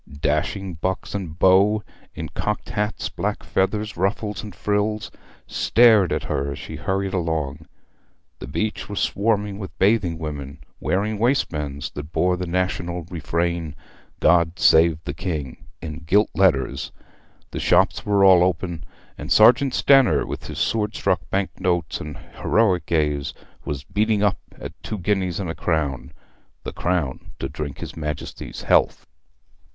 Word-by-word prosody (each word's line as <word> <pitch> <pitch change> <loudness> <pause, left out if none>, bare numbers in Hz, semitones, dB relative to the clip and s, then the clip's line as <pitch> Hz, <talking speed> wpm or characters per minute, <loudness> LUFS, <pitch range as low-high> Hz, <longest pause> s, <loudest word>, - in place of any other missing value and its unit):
Dashing 85 +6 -1
bucks 95 0 -2
and 90 -6 -5
beaux 100 +3 +4 0.3
in 80 -1 -5
cocked 105 +7 -3
hats, 105 0 -2
black - - -3
feathers, 105 +3 -1
ruffles, 100 +2 -1
and 105 -5 -9
frills, 105 0 -1 0.3
stared 110 -6 +4
at - - -1
her 70 +1 -2
as - - -8
she - - -8
hurried 95 0 -2
along; 80 -4 -2 0.7
the - - -7
beach 110 +12 -3
was 105 - -3
swarming 105 -1 0
with 95 - -8
bathing 95 -4 +2
women, 75 -2 -6 0.2
wearing 105 +3 -1
waistbands 75 - -1
that 75 +2 -8
bore 90 +1 +2
the 90 0 -4
national 90 -1 -1
refrain, 85 -1 -2 0.4
'God 85 0 +3
save 80 0 +5
the 85 - -4
King,' 75 -9 -5 0.2
in 80 -1 -5
gilt 100 +7 +2
letters; 90 -9 +1 0.6
the - - -4
shops - - +3
were 100 -1 +3
all 95 -2 +7
open, 85 -2 -1 0.4
and - - -6
Sergeant 125 +5 +6
Stanner, 135 -3 +5
with - - -6
his - - -7
sword 105 -1 0
stuck 95 -2 0
bank 95 0 0
notes 90 -3 0
and 75 -1 -7
heroic 95 -7 0
gaze, 75 -4 0 0.3
was 70 -2 -4
beating 105 +3 +1
up 105 - +2 0.2
at - - -7
two 105 - -4
guineas 95 -2 -1
and 95 - -3
a - - -4
crown, 70 -6 -2 0.5
the - - -5
crown 85 -7 -2
to 65 - -3
drink 70 0 -6
his - - -7
Majesty's 75 -2 -6
health. - - +2
90 Hz, 145 wpm, -23 LUFS, 80-105 Hz, 0.7 s, all